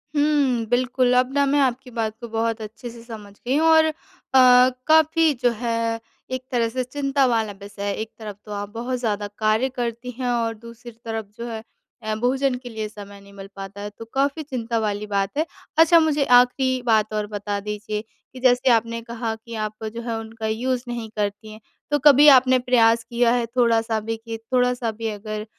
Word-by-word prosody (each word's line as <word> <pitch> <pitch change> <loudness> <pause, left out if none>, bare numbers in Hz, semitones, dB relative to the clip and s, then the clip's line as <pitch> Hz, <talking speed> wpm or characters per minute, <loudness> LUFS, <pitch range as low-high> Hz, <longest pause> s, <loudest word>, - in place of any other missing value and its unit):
हुँ, 290 - +3
हुँ। 275 -6 +1
बिल्कुल। 250 0 +2
अब 255 +1 +2
ना 285 0 +3
मैं 285 +1 +2
आपकी 255 -1 0
बात 225 -2 -3
को 235 - -6
बहुत 225 0 -1
अच्छे 220 +3 -8
से 230 0 -12
समझ 215 -4 -10
गई 250 +6 -3
हूँ 320 +1 +3
और 320 0 +6
अ, 315 - 0 0.9
काफ़ी 315 0 +4
जो 245 - +4
है 230 -1 -1 0.3
एक 255 0 -3
तरह 235 -2 +1
से 255 +2 -2
चिंता 275 +1 0
वाला 225 -4 +1
विषय 200 0 -10
है। 200 0 -1
एक 220 - -6
तरफ 210 -2 -7
तो 210 - -10
आप 205 0 -4
बहुत 245 +2 -3
ज़्यादा 210 -3 -2
कार्य 220 +4 +1
करती 245 -1 -4
हैं 250 -1 -1
और 230 -2 0
दूसरी 235 +2 -12
तरफ 225 -1 -4
जो 235 - -5
है 220 -1 -6 0.4
अ, 215 0 -2
भोजन 255 +3 +1
के 245 - -7
लिए 220 -2 -4
समय 200 -1 -11
नहीं 200 0 -17
मिल 195 -1 -10
पाता 195 +1 -8
है 205 - -5
तो 225 - -9
काफ़ी 280 +3 0
चिंता 235 -4 -3
वाली 210 -1 -2
बात 200 +5 -2
है। 315 - +2 0.3
अच्छा 330 +1 +7
मुझे 300 -3 +2
आखिरी 250 +1 +4
बात 215 -2 +2
और 210 -1 -2
बता 205 -1 -4
दीजिए 210 +1 -4 0.3
कि 260 - -9
जैसे 250 0 +3
आपने 230 0 +1
कहा 230 -1 -4
कि 230 +1 -10
आपको 215 +1 -6
जो 230 +2 -7
है 230 -1 -3
उनका 225 0 -6
यूज़ 245 +3 -1
नहीं 235 -2 -5
करती 210 +1 -3
हैं। 215 - -11 0.3
तो 290 - +2
कभी 290 +1 +7
आपने 255 0 +3
प्रयास 235 -2 +3
किया 235 0 +1
है 245 -1 +1
थोड़ा-सा 230 -2 +1
भी 225 +1 -4
कि 225 0 -7
थोड़ा-सा 250 0 0
भी 225 +1 -5
अगर 215 0 -5
230 Hz, 205 wpm, -23 LUFS, 215-255 Hz, 0.9 s, अच्छा